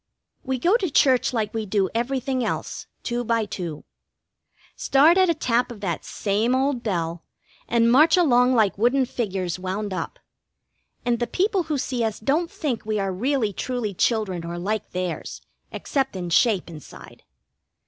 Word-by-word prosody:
We 260 -1 -1
go 355 - +3
to 375 -7 -2
church 265 -3 +3
like 220 -4 -2
we 220 -2 -3
do 195 -1 +1
everything 255 +2 -1
else, 225 - -4 0.2
two 240 0 -2
by 230 -1 +1
two. 175 -6 -6 0.9
Start 300 +5 +4
at 375 -1 +4
a 335 - +2
tap 245 -3 0
of 230 - -9
that 175 -6 -2
same 215 +5 0
old 265 -1 0
bell, 170 -6 -2 0.4
and 235 0 +3
march 305 +8 +6
along 255 -6 +4
like 210 -4 +2
wooden 255 +4 +3
figures 190 -8 -3
wound 190 +2 -3
up; 185 - -4 0.9
and 240 -1 +1
the 240 - -1
people 385 - 0
who 300 - +1
see 250 -2 -2
us 220 -2 -2
don't 310 +9 0
think 260 -8 -3
we 215 -1 -1
are 195 -1 -1
really 235 +1 0
truly 240 -1 -3
children 190 -4 0
or 170 +1 -5
like 205 +5 -2
theirs, 180 -2 -4 0.3
except 270 -6 -2
in 175 -2 -4
shape 205 +2 +3
inside. 160 -3 -12
230 Hz, 165 wpm, -24 LUFS, 195-265 Hz, 0.9 s, march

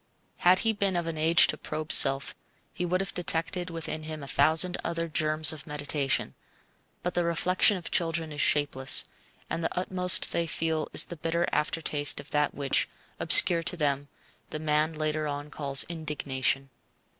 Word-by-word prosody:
Had 180 +1 +3
he 225 - +1
been 200 -3 -2
of 175 -1 -2
an 165 -1 -5
age 160 +2 +3
to - - -4
probe 155 0 -7
self, 135 0 +5 0.4
he 180 - -5
would 185 +2 -1
have 195 - -6
detected 175 +1 -2
within 165 -1 -4
him 155 -1 -9
a - - -10
thousand 160 +6 +2
other 165 0 -4
germs 155 0 +2
of 155 0 -12
meditation; 145 -2 -2 0.7
but 180 - -3
the 175 - -1
reflection 180 +4 +2
of 175 - -8
children 165 -2 -1
is 145 -1 -4
shapeless, 140 -3 +1 0.4
and 165 - -5
the - - -4
utmost 180 0 +4
they 170 0 -2
feel 160 -1 -3
is - - +6
the 175 - -10
bitter 165 +2 -2
aftertaste 150 -2 -1
of 140 - -13
that 150 -1 -1
which, 140 -1 -1 0.3
obscure 170 -2 +7
to 175 - -2
them, 145 -2 -2 0.4
the - - -6
man 155 +1 -1
later 155 0 -3
on 145 +1 -7
calls 140 -3 +2
indignation. 140 -4 -3
155 Hz, 170 wpm, -26 LUFS, 150-170 Hz, 0.7 s, obscure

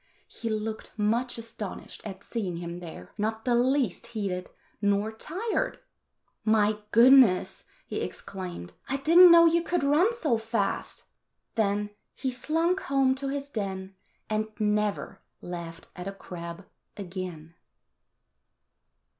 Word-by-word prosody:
He 230 - -5
looked 220 0 -4
much 230 +4 +1
astonished 225 -3 -7
at 195 -2 -8
seeing 195 -7 -3
him 170 0 -5
there, 160 - -9
not 220 +1 -2
the 245 - +2
least 245 -3 +1
heated 200 -6 -3 0.3
nor 205 +1 +2
tired. 365 - -2 0.7
"My 215 -1 +3
goodness!" 235 -4 +6 0.2
he - - -4
exclaimed. 180 - -6 0.2
"I 270 - 0
did 320 +5 +4
n't 365 -1 +11
know 335 0 +9
you 335 +1 +4
could 345 -2 -1
run 305 +10 +4
so 295 - +1
fast." 225 -3 -2 0.5
Then 205 -2 0 0.2
he 260 -1 -2
slunk 325 +8 +1
home 270 -4 +2
to 275 +1 -4
his 280 +1 -4
den, 195 -3 -4 0.3
and 215 0 0
never 210 -2 0 0.2
laughed 170 -1 -7
at 180 +1 -6
a 195 - -4
crab 170 -1 -8 0.3
again. 180 -4 -6
215 Hz, 130 wpm, -28 LUFS, 190-265 Hz, 0.7 s, n't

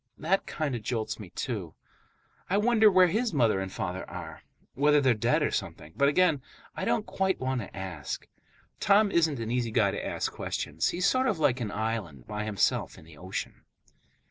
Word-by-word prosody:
That 185 +5 0
kind 155 -4 -2
of 120 - -4
jolts 110 0 -3
me, 100 -4 -9
too. 95 -6 -4 0.7
I 195 - +2
wonder 220 0 +5
where 185 -2 +6
his 215 +2 0
mother 115 -7 +3
and 95 0 -4
father 90 +1 -4
are, - - -8 0.3
whether 150 +2 +4
they're 130 -3 +4
dead 105 - +1
or - - +1
something; 80 - -4
but 140 0 +4
again, 155 -2 +3 0.3
I - - -3
don't 215 - +1
quite 190 -1 0
want 130 -1 -1
to 100 - -10
ask. 90 -7 -5 0.5
Tom 205 0 +4
isn't 160 -5 +2
an 115 0 -3
easy 120 -1 0
guy 110 -3 +2
to - - -4
ask - - -2
questions. 75 +3 -2
He's 180 +2 -1
sort 260 +4 +3
of 210 - +1
like 140 -5 +2
an 110 - -2
island, 100 - -3
by 105 0 -4
himself 105 -3 0
in - - -14
the 80 -2 -15
ocean. 95 +1 -5
125 Hz, 195 wpm, -28 LUFS, -, 0.7 s, where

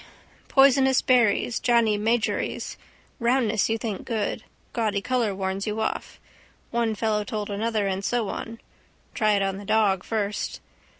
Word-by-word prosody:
Poisonous 270 -1 +5
berries. 240 -2 +3
Johnny 235 -3 +3
Magories. 220 +2 -1 0.4
Roundness 235 -3 +2
you 225 - +1
think 220 -4 -4
good. 220 -1 -2 0.3
Gaudy 215 -4 0
colour 230 -2 0
warns 190 +1 -3
you 210 +1 -2
off. 220 - -3 0.5
One 230 -2 0
fellow 210 -1 0
told 210 0 -4
another 215 0 -1
and 195 0 -2
so 235 0 0
on. 230 0 -6 0.5
Try 215 -2 +2
it 200 -1 +2
on 195 0 -1
the 200 - -8
dog 200 -3 +2
first. 210 -2 -2
220 Hz, 140 wpm, -25 LUFS, 205-235 Hz, 0.5 s, Poisonous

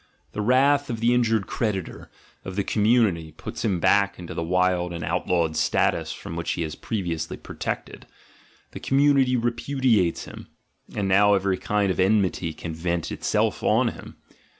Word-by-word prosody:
The 105 - -4
wrath 140 +5 +3
of 115 -2 -3
the 120 +2 +3
injured 115 -4 +2
creditor, 100 -6 -3 0.3
of 95 - -7
the 100 - 0
community, 105 -8 +1
puts - - -7
him 95 -6 0
back 100 +3 +3
in 90 - -9
the 85 - -5
wild 90 0 +1
and 85 -1 -5
outlawed 85 0 0
status 80 0 +1
from 80 - -7
which 85 0 -2
he 85 - -2
was 80 -1 -5
previously 85 -7 -4
protected: - - -6 0.6
the - - -8
community 135 -2 +3
repudiates 120 -5 +1
him - - -11 0.2
— - - -21
and 100 - 0
now 100 +2 +5
every 95 -1 0
kind 105 -2 0
of 95 - -4
enmity 95 -3 +1
can 80 +1 -7
vent 85 0 -2
itself - - 0
on - - +2
him. - - -11
95 Hz, 165 wpm, -24 LUFS, 85-115 Hz, 0.6 s, now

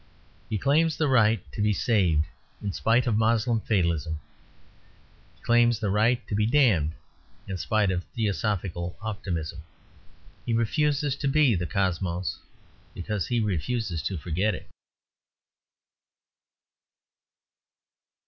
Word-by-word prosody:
He 110 - -1
claims 150 - +2
the 155 - +1
right 115 -4 +4
to - - -4
be 105 0 +3
saved, 90 -9 +2 0.3
in 100 -2 -4
spite 115 +3 +2
of 110 -3 +1
Moslem 115 +1 +2
fatalism. 85 -7 0 1.2
He - - -29
claims 120 0 +4
the 105 -3 -1
right 110 +4 +2
to - - -5
be 105 +1 +2
damned 110 - +3 0.5
in 95 - -3
spite 105 +1 +1
of 90 -1 -2
theosophical 100 -6 -2
optimism. 85 -7 -4 0.8
He 120 - -2
refuses 145 +4 +1
to 140 - -2
be 140 -3 +4
the 90 -2 -1
Cosmos; 90 -1 -1 0.6
because 100 0 -3
he 120 - 0
refuses 100 -1 -1
to 95 - -3
forget 90 +6 -1
it. - - -10
105 Hz, 120 wpm, -26 LUFS, 90-120 Hz, 1.2 s, right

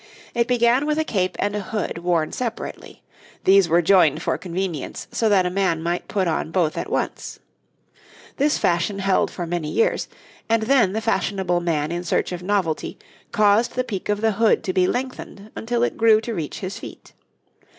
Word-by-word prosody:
It 235 -1 +1
began 245 +3 +3
with 300 0 0
a 315 - +2
cape 185 -10 -1
and 205 0 -1
a - - -1
hood 205 -3 -3
worn 170 -3 0
separately; 235 -3 -6 0.4
these 190 -2 +5
were 170 +2 +4
joined 170 -4 +4
for - - 0
convenience 180 -2 -4
so 225 - +1
that 195 -3 +4
a 180 - -1
man 180 -4 0
might 175 +1 -2
put 190 -3 0
on 160 -1 -1
both 165 -2 0
at - - -4
once. - - -3 1.0
This 290 +2 +2
fashion 175 +3 0
held 195 -1 +1
for 175 - -5
many 165 -2 -3
years, 225 - +1 0.4
and 225 -1 +2
then 235 -6 +3
the 220 - -1
fashionable 190 -4 0
man 155 -3 -1
in 175 +1 -3
search 175 - 0
of 180 -1 -5
novelty 185 -4 -1 0.3
caused 215 +1 +3
the 255 - +1
peak 205 -6 -5
of 205 0 0
the 225 0 +3
hood 220 +2 +2
to 185 - -2
be 180 -1 +3
lengthened 245 -4 -5
until 240 +1 -1
it - - -1
grew 225 -1 +5
to 230 +1 -4
reach 160 -7 -4
to - - -8
his 195 +3 -5
feet. - - -11
195 Hz, 190 wpm, -22 LUFS, 175-225 Hz, 1.0 s, these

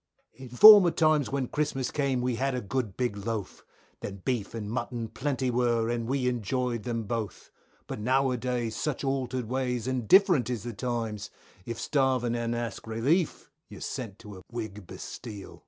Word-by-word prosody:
In 130 +2 -11
former 200 - +10
times 155 -4 +2
when 135 -2 -1
Christmas 135 -3 -1
came 135 -4 0
we 125 -2 -1
had 135 +1 0
a - - -1
good 110 -2 -3
big 125 -4 0
loaf, 105 -1 -4 0.4
Then 95 -2 -7
beef 120 -5 -2
and 110 -2 -4
mutton 120 0 -3
plenty 130 -1 -1
were, 120 -2 +1
and 115 -1 -2
we 130 0 0
enjoyed 125 0 -1
them 115 -2 -2
both, 110 -3 -5 0.3
But - - -6
now 130 +4 +2
a 125 - -1
days 120 -2 -2
such 150 -3 -2
altered 130 -2 -1
ways 125 -1 -2
and 130 -4 -2
different 180 - +5
is 120 -5 -3
the 120 0 -5
times, 110 -2 -3 0.4
If 115 0 -4
starving 130 -4 +1
and 120 0 -1
ask 115 -2 -5
relief 140 +9 0 0.2
you're - - -10
sent 115 -7 -5
to 105 -4 -11
a - - -14
Whig 105 -5 -6
bastile. 105 -5 -9
120 Hz, 175 wpm, -28 LUFS, 115-130 Hz, 0.4 s, former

